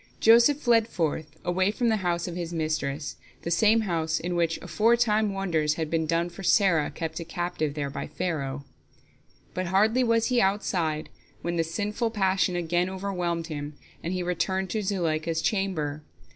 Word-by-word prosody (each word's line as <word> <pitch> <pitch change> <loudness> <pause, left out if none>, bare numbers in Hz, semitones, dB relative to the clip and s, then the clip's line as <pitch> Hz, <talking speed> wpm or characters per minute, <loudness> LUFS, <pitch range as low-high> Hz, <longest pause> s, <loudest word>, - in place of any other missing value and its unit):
Joseph 235 +5 +6
fled 230 -4 +3
forth, 160 -6 -1 0.2
away 185 +2 +2
from 235 +3 0
the 220 - +2
house 175 -3 -1
of 175 - -5
his 175 -1 -4
mistress, 155 -2 -2 0.3
the 170 - -3
same 215 +6 +4
house 165 -5 -1
in 175 0 -3
which 170 -1 +1
aforetime 215 +3 +2
wonders 165 -6 0
had 160 -2 -3
been 160 -1 0
done 170 +2 +1
for 175 +3 -10
Sarah 185 -5 +3
kept 160 -1 -5
a - - -4
captive 165 -3 -3
there 140 -2 -3
by - - -5
Pharaoh. 140 -6 -3 0.9
But 185 0 -2
hardly 215 +7 +3
was 230 0 +2
he 250 -1 +3
outside 175 -6 0 0.3
when 170 0 -1
the 165 - +3
sinful 210 +7 -2
passion 190 -4 +1
again 175 +1 0
overwhelmed 180 -3 -2
him, 150 -2 -6 0.3
and 170 - -2
he 185 -1 -1
returned 190 +2 -1
to 215 - -1
Zuleika's 165 -5 -1
chamber. 160 -7 -1
175 Hz, 170 wpm, -27 LUFS, 160-200 Hz, 0.9 s, Joseph